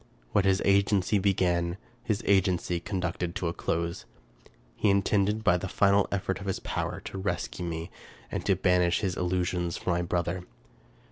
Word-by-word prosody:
What 100 - +3
his 95 0 +3
agency 100 0 +3
began, 90 -3 +1 0.3
his 110 -2 -1
agency 95 -3 +2
conducted 90 -2 -3
to 90 - -1
a 85 - -1
close. 85 +2 -2 0.7
He 105 - +2
intended, 100 +2 +2
by 90 -5 +4
the 95 - -4
final 100 +1 +3
effort 95 -1 -1
of 100 - -7
his 95 - -1
power, - - -3
to 95 - -7
rescue 95 -2 -3
me 85 +1 -4 0.4
and - - -3
to 95 - +4
banish 90 -1 +2
his 95 -4 -1
illusions 90 -1 -1
from 90 - -1
my 85 - 0
brother. 90 +1 -1
95 Hz, 160 wpm, -28 LUFS, 85-100 Hz, 0.7 s, by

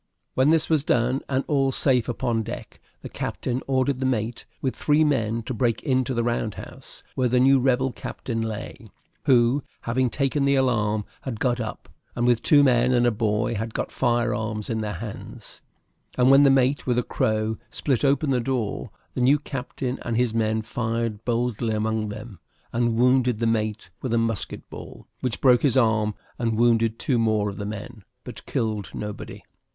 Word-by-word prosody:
When 130 +3 +3
this 160 -1 +3
was 155 -4 +2
done, 125 0 +1
and 135 0 +1
all 135 -2 +2
safe 125 -2 +2
upon 115 -1 -1
deck, 110 - -8 0.2
the - - -5
captain 125 +1 -3
ordered 130 0 +1
the 130 - 0
mate, 115 -2 -2
with 130 - -2
three 150 +1 +3
men, 115 -6 0
to 130 - -4
break 115 -1 0
into 130 -1 0
the 120 - +1
round 115 -3 -1
house, - - -11
where 130 - +1
the 125 +1 +2
new 135 +1 +5
rebel 130 0 +2
captain 115 -1 -5
lay, 110 -2 -6 0.4
who, 130 0 +4 0.2
having 125 +2 0
taken 140 +2 0
the 140 0 +3
alarm, 110 -5 +1 0.2
had 120 -5 -5
got 125 -1 +1
up, 110 -2 -5 0.3
and 120 - 0
with 120 -2 +3
two 145 -2 +5
men 125 -1 +3
and 120 -1 +3
a 120 - +4
boy 105 +1 0
had 110 +1 -4
got - - -2
fire 120 -1 +1
arms 110 0 -3
in 110 -1 -1
their 105 -1 -3
hands; 105 +3 -9 0.6
and 125 +1 +5
when 135 +1 +7
the 140 - +6
mate, 135 +1 +2
with 120 -1 +1
a 125 - +2
crow, 110 0 -1
split 130 +1 -1
open 140 +1 +2
the 125 - +2
door, 120 -3 -2 0.2
the - - -2
new 135 +4 +5
captain 130 -2 -5
and 115 -1 -2
his 120 -2 +1
men 110 -1 0
fired 115 -1 -2
boldly 120 -2 0
among 110 0 -1
them, 105 -2 -8 0.3
and 120 -1 +1
wounded 125 0 +3
the 115 - -1
mate 110 -1 -1
with 120 -3 -1
a - - +3
musket 115 -2 -1
ball, - - -10
which 125 -4 -2
broke 125 -3 +5
his 135 -3 +3
arm, 110 -3 +2 0.2
and 115 -2 0
wounded 115 -1 +3
two 130 -7 0
more 110 -2 +1
of 100 - -11
the 100 - -4
men, 110 +1 -7 0.2
but - - -9
killed 110 -3 -2
nobody. 105 -1 -6
120 Hz, 190 wpm, -24 LUFS, 110-130 Hz, 0.6 s, when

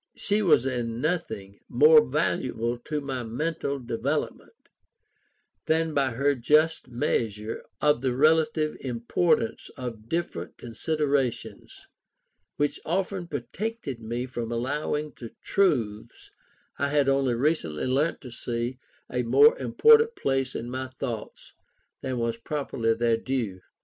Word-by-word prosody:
She 205 +1 0
was 170 - +4
in 120 -3 -2
nothing 110 - -3
more 460 0 +7
valuable 115 - -1
to 150 +4 -3
my 135 -2 -3
mental 140 +5 -2
development 130 +4 -3 1.1
than 160 0 +1
by 140 -2 +2
her 140 +4 +2
just 150 +6 +2
measure 110 -3 -2 0.2
of 150 -4 +3
the 130 -2 0
relative 155 +1 +3
importance 165 - 0
of 115 -4 -7
different 165 - -3
considerations, 140 +1 -2 0.7
which 145 0 0
often 185 +1 -2
protected 175 - -4
me 120 +3 -3
from 120 -3 -5
allowing 150 +5 -2
to 115 -2 -9
truths 120 - 0 0.5
I 140 - +2
had 145 -1 +2
only 135 -3 +2
recently 120 - 0
learnt 140 +5 +1
to 125 - -10
see, 120 +1 -3 0.3
a 125 - -1
more 440 - +6
important 455 +1 +5
place 135 -1 -1
in 120 +1 -4
my 130 +1 -3
thoughts 125 -4 -6 0.5
than 130 -1 -3
was 115 -1 -1
properly 115 -4 -1
their 115 0 +2
due. 115 -7 -3
130 Hz, 125 wpm, -26 LUFS, 115-155 Hz, 1.1 s, more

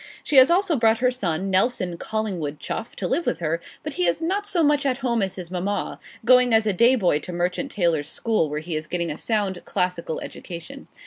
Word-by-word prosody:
She 295 - +1
has 260 +1 +8
also 355 -1 +3
brought 225 -1 +4
her 250 +1 +2
son, 195 -6 -2
Nelson 190 -2 +1
Collingwood 175 -7 -3
Chuff, - - -5
to - - -2
live 340 - 0
with - - 0
her; 165 0 -1 0.2
but 305 - -4
he 180 -7 +1
is 170 - +1
not 390 +5 -1
so 360 -5 +1
much 295 -1 +3
at 265 -3 0
home 235 -2 +1
as 190 -1 -1
his 180 -2 -8
mamma, 190 +3 -2 0.3
going 250 -1 +5
as 220 0 +3
a 210 - +1
day 235 +7 +5
boy 180 -10 +2
to 180 - -8
Merchant 180 +10 -2
Taylors' 165 -6 0
School, 220 -9 0
where 150 +1 -3
he 165 0 -4
is 155 0 -4
getting 170 -1 -2
a 150 - -5
sound 205 -5 -1
classical 180 -4 -2
education. 170 -2 -8
195 Hz, 220 wpm, -23 LUFS, 170-250 Hz, 0.3 s, has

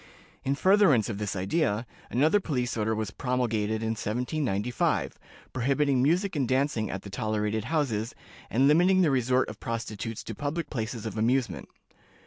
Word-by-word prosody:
In 135 +1 0
furtherance 185 - +4
of 105 -3 -4
this 105 -2 -2
idea, 105 - 0 0.2
another 155 +11 +3
police 125 -9 -2
order 110 0 0
was 110 -3 -3
promulgated 110 -3 -1
in 110 - -1
1795, 120 0 -1 0.3
prohibiting 135 +1 +2
music 175 +7 +2
and 135 -4 0
dancing 130 -5 0
at 95 - -5
the 100 - -9
tolerated 110 +1 -1
houses, 115 -9 -1 0.3
and 130 +4 +3
limiting 180 +5 +5
the 155 - +3
resort 130 0 +2
of - - -8
prostitutes 115 -1 -4
to 115 - -6
public 145 +8 -3
places 115 -3 -4
of 110 -1 -4
amusement. 115 -4 0
125 Hz, 150 wpm, -28 LUFS, 110-145 Hz, 0.3 s, limiting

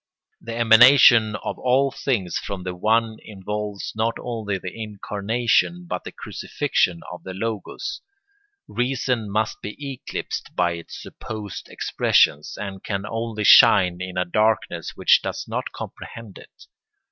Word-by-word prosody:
The 115 0 -6
emanation 115 -1 +7
of - - -5
all 130 +2 +2
things 105 -12 -2
from 95 -2 -6
the 90 0 -4
One 110 +4 +1
involves 105 0 -5
not 110 +1 0
only 110 -5 -3
the 90 0 -7
incarnation 115 - -1
but - - -4
the - - -6
crucifixion 85 -2 -2
of 90 - -9
the 95 0 -8
Logos. 110 - -4 0.7
Reason 125 -3 -1
must 110 +2 -1
be 105 - -7 0.2
eclipsed 125 - -6
by 90 -1 +2
its 85 0 -8
supposed 105 -3 -8
expressions, 75 +1 +1
and 100 -2 -6
can 100 -1 -3
only 115 -1 -4
shine 90 -3 +6
in 95 0 -6
a 90 - +1
darkness 110 +4 0
which - - +5
does - - -4
not - - -4
comprehend 115 -4 -9
it. - - -17
110 Hz, 135 wpm, -23 LUFS, 95-115 Hz, 0.7 s, emanation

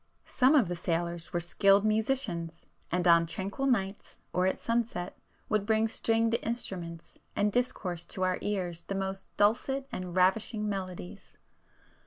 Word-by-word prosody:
Some 265 +3 +4
of 255 -10 +5
the 175 - -2
sailors 170 0 -2
were 175 - 0
skilled 195 +4 +3
musicians, 215 -7 -1 0.3
and 180 +1 +1
on 170 -1 +6
tranquil 195 +10 -3
nights 195 -6 -1 0.2
or 180 +1 +2
at 190 - 0
sunset, 230 -6 -2 0.3
would 215 -2 +1
bring 220 +1 +2
stringed 225 0 +1
instruments 175 -8 -4 0.2
and 205 0 +2
discourse 190 -8 -1
to 185 - -4
our 185 0 +1
ears 180 -5 -2
the 195 - -5
most 195 0 -3
dulcet 260 +6 +2
and 180 -1 -5
ravishing 210 +4 +2
melodies. 185 - -6
195 Hz, 145 wpm, -30 LUFS, 175-220 Hz, 0.3 s, on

